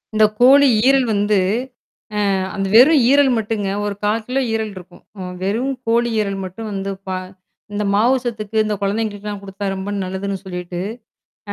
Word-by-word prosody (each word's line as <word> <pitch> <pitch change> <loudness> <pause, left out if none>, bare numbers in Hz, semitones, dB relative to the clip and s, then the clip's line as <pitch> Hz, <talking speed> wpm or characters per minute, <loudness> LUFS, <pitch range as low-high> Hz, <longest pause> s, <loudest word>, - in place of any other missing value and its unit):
இந்த 215 0 +6
கோழி 275 +3 +7 0.2
ஈரல் 270 -1 +4
வந்து 205 0 +2 1.0
அ - - +1 0.2
அந்த 195 -1 -1
வெறும் 275 +6 +7
ஈரல் 280 -1 +5
மட்டுங்க. 210 -2 -2 0.2
ஒரு 205 -1 -2
1/4 215 +2 0
கிலோ 260 +2 0
ஈரல் 220 -1 -1
இருக்கும். 180 -1 -12 0.2
அ - - -6 0.2
வெறும் 230 +8 0
கோழி 235 +1 +2
ஈரல் 200 -2 -1
மட்டும் 190 +4 -7
வந்து 195 0 -3 0.2
பா 190 0 -2 0.6
இந்த 205 0 -2
மாவு 235 +6 +4
சத்துக்கு 220 -2 -4
இந்த 210 0 -1
கொழந்தைகளுக்குலாம் 205 0 -2
குடுத்தா 195 +1 -7
ரொம்ப 190 +1 -5
நல்லதுன்னு 190 +1 -4
சொல்லிட்டு. 180 -1 -5 0.7
அ - - -1
210 Hz, 160 wpm, -19 LUFS, 195-230 Hz, 1.0 s, கோழி